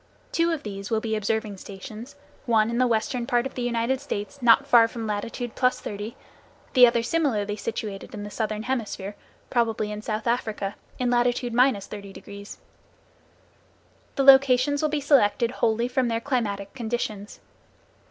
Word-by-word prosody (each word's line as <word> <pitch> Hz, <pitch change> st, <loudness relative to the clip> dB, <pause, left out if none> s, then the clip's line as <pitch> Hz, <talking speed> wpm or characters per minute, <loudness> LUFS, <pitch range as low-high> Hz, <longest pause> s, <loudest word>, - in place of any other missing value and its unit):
Two 335 Hz, 0 st, +2 dB
of 320 Hz, -3 st, -3 dB
these 200 Hz, -1 st, -6 dB
will 225 Hz, -, +1 dB
be 220 Hz, 0 st, -2 dB
observing 215 Hz, -1 st, -2 dB
stations, 215 Hz, +8 st, -9 dB, 0.3 s
one 225 Hz, -1 st, +3 dB
in 235 Hz, -, -1 dB
the 255 Hz, -, +4 dB
western 235 Hz, +1 st, -1 dB
part 240 Hz, 0 st, +2 dB
of 270 Hz, -, -5 dB
the 250 Hz, -, -5 dB
United 240 Hz, +2 st, 0 dB
States, 280 Hz, 0 st, -5 dB
not 240 Hz, +3 st, +6 dB
far 240 Hz, -4 st, +6 dB
from 230 Hz, 0 st, -6 dB
latitude 220 Hz, +3 st, -4 dB
+30°, 220 Hz, -4 st, -1 dB, 0.6 s
the 250 Hz, -2 st, +8 dB
other 235 Hz, -1 st, +1 dB
similarly 230 Hz, -9 st, 0 dB
situated 210 Hz, -2 st, -5 dB
in 205 Hz, -, -6 dB
the 205 Hz, -, -7 dB
southern 215 Hz, -1 st, -2 dB
hemisphere, 215 Hz, -5 st, -3 dB, 0.4 s
probably 225 Hz, -3 st, 0 dB
in 210 Hz, 0 st, -5 dB
South 215 Hz, 0 st, -3 dB
Africa, 220 Hz, -4 st, -1 dB, 0.2 s
in 250 Hz, -1 st, 0 dB
latitude 245 Hz, 0 st, +1 dB
30°. 205 Hz, -4 st, -2 dB, 1.6 s
The 275 Hz, -, +1 dB
locations 270 Hz, +1 st, +6 dB
will 310 Hz, -, +1 dB
be 300 Hz, 0 st, 0 dB
selected 240 Hz, -4 st, +3 dB
wholly 235 Hz, -1 st, +1 dB
from 255 Hz, 0 st, 0 dB
their 230 Hz, -1 st, 0 dB
climatic 210 Hz, -7 st, -2 dB
conditions. 220 Hz, -4 st, -4 dB
230 Hz, 150 wpm, -25 LUFS, 210-250 Hz, 1.6 s, the